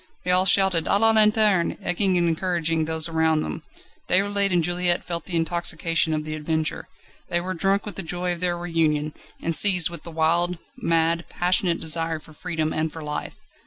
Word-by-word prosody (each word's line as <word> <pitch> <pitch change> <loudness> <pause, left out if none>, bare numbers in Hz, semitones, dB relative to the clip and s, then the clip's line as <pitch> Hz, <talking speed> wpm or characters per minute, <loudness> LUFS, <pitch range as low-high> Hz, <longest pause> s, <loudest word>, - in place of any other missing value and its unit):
They 180 - +1
all 185 +1 +4
shouted 190 -3 +3
"A 200 - +3
la 225 +2 +4
lanterne!" 215 -4 +3
egging 185 +1 +1
and 170 -1 +1
encouraging 165 -1 -1
those 160 0 +1
around 160 -1 +1
them. 165 - -6 0.5
Déroulède 200 +1 +2
and 175 -2 +2
Juliette 175 +1 +1
felt 170 0 -4
the 180 - -3
intoxication 165 -1 +1
of 155 - -3
the 155 - -5
adventure. 155 0 -3 0.4
They 175 - +1
were 185 +2 -4
drunk 195 +3 0
with 210 - -7
the - - 0
joy 180 +1 -3
of 175 - -8
their 175 -1 0
reunion, 160 -3 -1 0.3
and 165 0 0
seized 180 -3 +5
with 170 - -5
the - - -10
wild, 170 +2 +1 0.2
mad, 165 -5 0
passionate 180 -1 0
desire 165 0 -1
for 155 0 -16
freedom 155 0 -3
and 155 0 -2
for 160 0 -9
life 150 0 -5
170 Hz, 190 wpm, -23 LUFS, 160-180 Hz, 0.5 s, seized